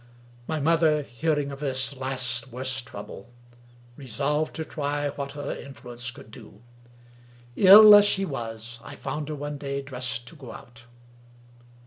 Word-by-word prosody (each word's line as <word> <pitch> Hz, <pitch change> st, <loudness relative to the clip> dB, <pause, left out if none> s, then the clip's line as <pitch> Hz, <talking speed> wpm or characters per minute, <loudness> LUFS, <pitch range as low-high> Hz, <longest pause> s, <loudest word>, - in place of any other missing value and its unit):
My 160 Hz, -1 st, -2 dB
mother, 155 Hz, 0 st, +2 dB
hearing 145 Hz, +2 st, -2 dB
of 140 Hz, -, -8 dB
this 135 Hz, -1 st, 0 dB
last 130 Hz, -2 st, -2 dB
worse 130 Hz, +1 st, -1 dB
trouble, 100 Hz, -2 st, -10 dB, 0.7 s
resolved 140 Hz, +4 st, -2 dB
to 160 Hz, -, -4 dB
try 145 Hz, -1 st, -3 dB
what 140 Hz, 0 st, -6 dB
her 145 Hz, -1 st, -5 dB
influence 120 Hz, -3 st, -8 dB
could 110 Hz, -2 st, -12 dB
do. 110 Hz, -2 st, -14 dB, 0.9 s
Ill 210 Hz, +2 st, +9 dB
as 205 Hz, 0 st, +9 dB
she 195 Hz, -1 st, +1 dB
was, 120 Hz, -4 st, -7 dB
I -, -, -10 dB
found 150 Hz, 0 st, -5 dB
her 155 Hz, -, -4 dB
one 145 Hz, 0 st, -6 dB
day 140 Hz, -1 st, -4 dB
dressed 125 Hz, -3 st, -4 dB
to 165 Hz, -, -14 dB
go 130 Hz, -7 st, -11 dB
out. 120 Hz, -1 st, -14 dB
140 Hz, 145 wpm, -25 LUFS, 120-150 Hz, 0.9 s, Ill